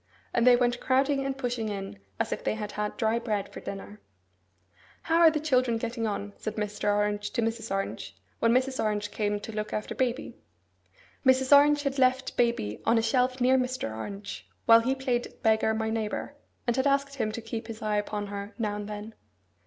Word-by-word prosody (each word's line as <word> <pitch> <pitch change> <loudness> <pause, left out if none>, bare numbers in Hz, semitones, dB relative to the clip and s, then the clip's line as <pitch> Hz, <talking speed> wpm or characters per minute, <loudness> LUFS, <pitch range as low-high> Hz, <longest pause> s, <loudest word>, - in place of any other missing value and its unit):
And 240 +1 +3
they 250 - +9
went 245 0 +1
crowding 275 +1 +2
and 270 0 -3
pushing 245 -4 -2
in, 195 - -5 0.2
as - - -1
if - - -3
they - - 0
had 210 -1 -5
had 210 0 -3
dry 230 -1 +1
bread 210 -4 -2
for - - -7
dinner. 205 +1 -8 1.0
'How 330 0 +2
are 335 -1 +8
the 310 -1 -1
children 255 -6 +2
getting 230 0 -2
on?' 205 -1 -4
said 215 - -5
Mr. 210 -1 -1
Orange 205 0 0
to 235 - 0
Mrs. 225 0 -2
Orange, 195 - -3 0.2
when 230 - +3
Mrs. 260 +2 +1
Orange 210 -1 -1
came 205 -1 -1
to 215 - -7
look 215 0 -4
after 210 - -3
baby. 255 0 -1 0.9
Mrs. 260 +1 +6
Orange 290 +1 +5
had 275 -1 -1
left 260 0 +2
baby 235 - 0
on 230 +1 +3
a 225 - +2
shelf 255 +2 +1
near 260 +1 +4
Mr. 250 - -2
Orange 110 - -7 0.2
while 230 0 +8
he 260 +4 0
played 255 -2 -1
at - - -23
beggar 220 -1 +3
my 220 0 -1
neighbour, 220 -2 -3 0.3
and 240 -2 +1
had 265 +2 +2
asked 275 0 +1
him 215 -4 0
to 230 - -4
keep 225 0 -6
his 225 -1 -7
eye 210 -1 +1
upon 205 0 -2
her 200 +1 -6
now 210 -3 -1
and 205 0 -6
then. 210 +1 -6
225 Hz, 205 wpm, -28 LUFS, 210-255 Hz, 1.0 s, they